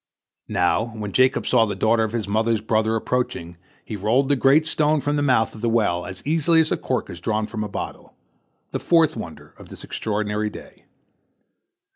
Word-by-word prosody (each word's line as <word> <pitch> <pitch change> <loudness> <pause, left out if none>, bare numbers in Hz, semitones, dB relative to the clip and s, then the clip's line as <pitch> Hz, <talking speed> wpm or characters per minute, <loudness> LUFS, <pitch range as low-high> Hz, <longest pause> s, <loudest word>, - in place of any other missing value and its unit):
Now, 90 +5 +1
when 105 -2 -5
Jacob 130 +3 +3
saw 115 -3 +3
the 100 - -3
daughter 110 +1 +2
of 110 - -2
his 110 -4 -3
mother's 110 +1 +1
brother 110 0 +1
approaching, 110 -8 -2 0.3
he 110 - -5
rolled 115 +7 +1
the 145 - +4
great 140 +4 +4
stone 155 -1 +2
from 145 +1 -1
the 145 - 0
mouth 125 -6 +2
of 110 - -11
the 120 - +1
well 100 -7 +1
as 95 - -8
easily 165 +2 +3
as 160 -1 +2
a - - +1
cork 130 - -2
is 85 -1 -9
drawn 110 +2 -1
from 110 0 -4
a 105 - -5
bottle—the - - -9
fourth 160 -2 +3
wonder 80 - -9
of - - -13
this - - -9
extraordinary 105 0 -2
day. - - -13
110 Hz, 190 wpm, -22 LUFS, 105-135 Hz, 0.3 s, the